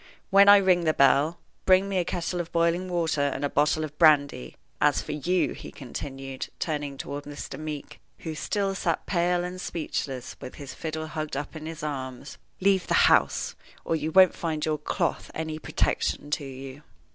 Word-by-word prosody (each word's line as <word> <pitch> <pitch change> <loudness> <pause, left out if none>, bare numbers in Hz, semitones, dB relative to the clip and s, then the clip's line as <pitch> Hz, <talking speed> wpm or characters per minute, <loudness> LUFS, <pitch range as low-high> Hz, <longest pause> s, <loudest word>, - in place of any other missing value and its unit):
"When 200 +1 +7
I 205 - +10
ring 185 -3 +3
the 155 - +2
bell, 140 +4 +4 0.3
bring 190 +1 +5
me 195 -2 0
a - - +2
kettle 175 +1 -3
of 170 - -9
boiling 170 +2 +1
water 165 -4 0
and 145 0 0
a - - 0
bottle 150 +2 +2
of 150 -1 -6
brandy. 145 - +4 0.3
As 150 -1 +4
for - - -6
you," 175 +5 0
he - - -9
continued, 135 0 -6
turning 145 -3 -3
toward 145 +1 -6
Mr. 145 +1 -7
Meeke, 155 -2 -6 0.2
who 160 - -6
still 195 +5 -1
sat 170 -3 -1
pale 175 -1 +1
and 180 +1 -5
speechless 135 -5 -4
with 130 - -8
his 140 -2 -8
fiddle 160 -1 -4
hugged 155 -2 -4
up 145 +3 -5
in 155 0 -7
his 160 -2 -7
arms, 135 -2 -5 0.2
"leave 190 -1 +2
the - - +2 0.2
house, - - +2 0.3
or 165 - +1
you 155 0 -2
won't 185 +1 +7
find 155 -3 -2
your 155 -1 -1
cloth 150 - -2
any 160 -1 -4
protection 145 -1 -1
to 150 -1 -1
you." 135 +1 -9
155 Hz, 185 wpm, -26 LUFS, 145-175 Hz, 0.3 s, I